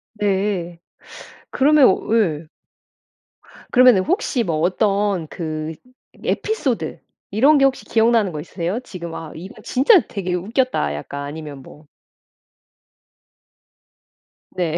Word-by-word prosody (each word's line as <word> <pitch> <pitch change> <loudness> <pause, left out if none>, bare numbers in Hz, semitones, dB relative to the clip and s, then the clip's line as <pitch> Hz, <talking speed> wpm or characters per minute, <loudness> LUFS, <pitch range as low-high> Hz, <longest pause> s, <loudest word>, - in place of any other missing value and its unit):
네. 190 -4 -1 0.7
그러면 295 +2 +4 0.3
예. 165 -9 +1 1.3
그러면 250 -4 +6
혹시 265 - 0
뭐 165 -4 -1
어떤 195 0 0
그 155 -1 -5 0.5
에피소드 290 - -2 0.3
이런 275 +9 +5
게 275 - +4
혹시 270 - 0
기억나는 225 -4 +2
거 150 - -5
있으세요? 175 +7 -4
지금 170 -8 -8
'아 160 -2 -7
이거 180 +5 -10
진짜 280 - +5
되게 185 -3 -4
웃겼다.' 205 - -1
약간 140 - -6
아니면 145 -1 -8
뭐 150 +3 -15 2.7
네. 170 -2 -1
190 Hz, 205 characters per minute, -20 LUFS, 165-235 Hz, 2.7 s, 그러면